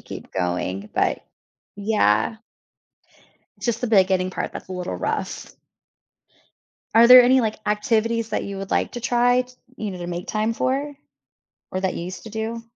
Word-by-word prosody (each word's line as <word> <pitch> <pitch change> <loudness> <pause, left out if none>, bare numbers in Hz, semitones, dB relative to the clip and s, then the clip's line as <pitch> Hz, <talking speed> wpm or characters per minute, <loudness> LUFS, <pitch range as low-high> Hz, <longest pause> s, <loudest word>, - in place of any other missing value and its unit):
keep - - -10
going, 90 +2 -2
but - - 0 0.5
Yeah. 200 - +1 1.2
Just 235 -2 -1
the 245 - +1
beginning 190 -3 +3
part - - -4
that's - - -9
a - - -6
little 180 -1 -4
rough. - - -4 1.4
Are 230 +1 +8
there 250 0 +10
any, 255 +2 +5
like, 220 -2 -2
activities 225 +2 0
that - - -1
you 200 -1 -6
would 195 0 -7
like - - 0
to 240 - -5
try, 245 +1 +3
t 250 - -18 0.2
you 215 -2 -4
know, 185 - -7
to 175 - -6
make 175 0 -5
time 215 +1 0
for? 275 +5 -1 0.8
Or 185 - -3
that 190 -1 -1
you 170 - -5
used 185 +1 -7
to 220 - -10
do? 220 +1 -4
215 Hz, 170 wpm, -23 LUFS, 185-235 Hz, 1.4 s, there